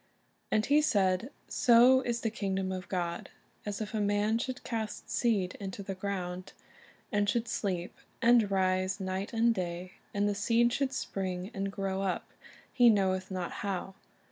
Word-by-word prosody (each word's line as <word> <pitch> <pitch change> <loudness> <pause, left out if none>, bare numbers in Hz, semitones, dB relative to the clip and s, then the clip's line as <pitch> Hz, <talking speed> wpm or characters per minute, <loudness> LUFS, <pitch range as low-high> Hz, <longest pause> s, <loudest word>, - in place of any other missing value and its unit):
"And 215 0 +2
He 295 +2 +4
said, 195 -4 +2 0.2
So 250 +1 +6
is 235 -2 -2
the 225 - -1
kingdom 195 -3 -2
of 185 -1 -5
God, 175 -2 -3 0.4
as 205 +1 -3
if 215 - -5
a 215 - 0
man 205 +2 +2
should 255 +1 -4
cast 220 -3 -4
seed 205 -7 +1
into 200 0 -6
the 195 - -4
ground; 185 -2 -4 0.6
and 205 -1 +2
should 235 0 0
sleep, 185 -5 -2 0.2
and 235 -3 +5
rise 185 0 +1
night 190 +1 -3
and 230 0 +3
day, 180 -2 -4 0.2
and 205 0 +1
the 205 - +1
seed 230 +4 +2
should 275 0 0
spring 190 -4 -3
and 195 0 -2
grow 195 -1 -2
up, 190 -2 -2 0.4
he 245 -1 +6
knoweth 190 -3 +2
not 185 -2 -3
how. 195 -1 -3
200 Hz, 165 wpm, -31 LUFS, 185-225 Hz, 0.6 s, So